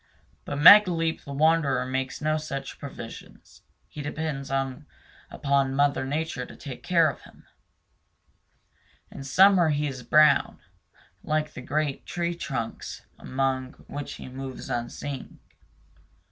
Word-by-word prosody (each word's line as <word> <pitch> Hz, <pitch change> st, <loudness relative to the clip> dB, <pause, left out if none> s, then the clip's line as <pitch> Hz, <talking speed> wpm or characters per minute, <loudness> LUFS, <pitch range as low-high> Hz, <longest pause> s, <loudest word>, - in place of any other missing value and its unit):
But -, -, -4 dB
Megaleep 165 Hz, -1 st, +6 dB
the 140 Hz, -, -8 dB
Wanderer 145 Hz, -3 st, +2 dB
makes 130 Hz, 0 st, -3 dB
no 155 Hz, +1 st, +1 dB
such 140 Hz, -3 st, -6 dB
provision 130 Hz, -5 st, -9 dB, 0.5 s
he 150 Hz, -, -8 dB
depends 145 Hz, -2 st, -4 dB, 0.8 s
upon 140 Hz, -2 st, 0 dB
Mother 140 Hz, -1 st, +1 dB
Nature 150 Hz, -2 st, -2 dB
to -, -, -11 dB
take 135 Hz, -4 st, -9 dB
care 170 Hz, -3 st, +3 dB
of 140 Hz, -, -4 dB
him. -, -, -18 dB, 1.7 s
In 135 Hz, -, -8 dB
summer 180 Hz, +4 st, +5 dB
he 150 Hz, 0 st, 0 dB
is 135 Hz, -3 st, -4 dB
brown, 155 Hz, +4 st, +4 dB, 0.7 s
like 155 Hz, 0 st, -1 dB
the -, -, -8 dB
great 145 Hz, +1 st, -2 dB
tree 175 Hz, 0 st, -2 dB
trunks 135 Hz, -, -5 dB
among 130 Hz, -1 st, -2 dB
which 145 Hz, 0 st, -6 dB
he -, -, -9 dB
moves 130 Hz, 0 st, -7 dB
unseen. 125 Hz, +3 st, -5 dB
145 Hz, 120 wpm, -26 LUFS, 135-155 Hz, 1.7 s, Megaleep